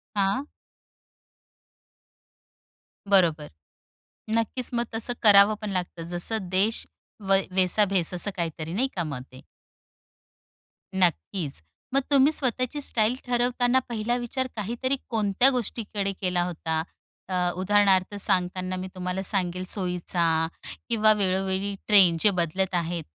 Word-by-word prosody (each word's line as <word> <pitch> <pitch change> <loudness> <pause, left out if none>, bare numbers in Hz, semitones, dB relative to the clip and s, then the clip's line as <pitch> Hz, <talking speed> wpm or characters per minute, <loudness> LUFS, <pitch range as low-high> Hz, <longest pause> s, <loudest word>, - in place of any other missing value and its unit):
हां. 200 +8 0 2.6
बरोबर. 165 -6 +3 0.9
नक्कीच 230 +2 0
मग 235 0 0
तसं 235 +2 0
करावं 205 0 +7
पण 215 - -4
लागतं 175 -2 -4
जसं 180 +2 0
देश 200 +5 0 0.4
व 195 - +6 0.2
वैसा 190 +3 +3
भेस 185 -3 +1
असं 190 +3 +3
काहीतरी 165 -1 -4
नाही 255 +7 +1
का, 175 - -1
मग 140 -5 -5
ते? 130 - -13 1.5
नक्कीच. 175 - 0 0.3
मग 275 - +3
तुम्ही 280 +2 +5
स्वतःची 255 +1 +1
स्टाईल 230 -2 +1
ठरवताना 245 +1 +1
पहिला 235 +1 -1
विचार 255 +2 -3
काहीतरी 235 +5 -2
कोणत्या 220 +3 +3
गोष्टीकडे 215 -5 -3
केला 180 -1 0
होता? 160 -2 -2 0.5
अ, 180 -1 0
उदाहरणार्थ 195 0 +2
सांगताना 185 0 0
मी 185 0 -5
तुम्हाला 180 +1 -3
सांगेल 185 -2 -1
सोयीचा 170 -3 0 0.4
किंवा 215 -2 +4
वेळोवेळी 195 0 -1
ट्रेंड 190 -5 +6
जे 210 - +6
बदलत 180 +3 -1
आहेत, 170 -1 -2
195 Hz, 115 wpm, -25 LUFS, 180-225 Hz, 2.6 s, करावं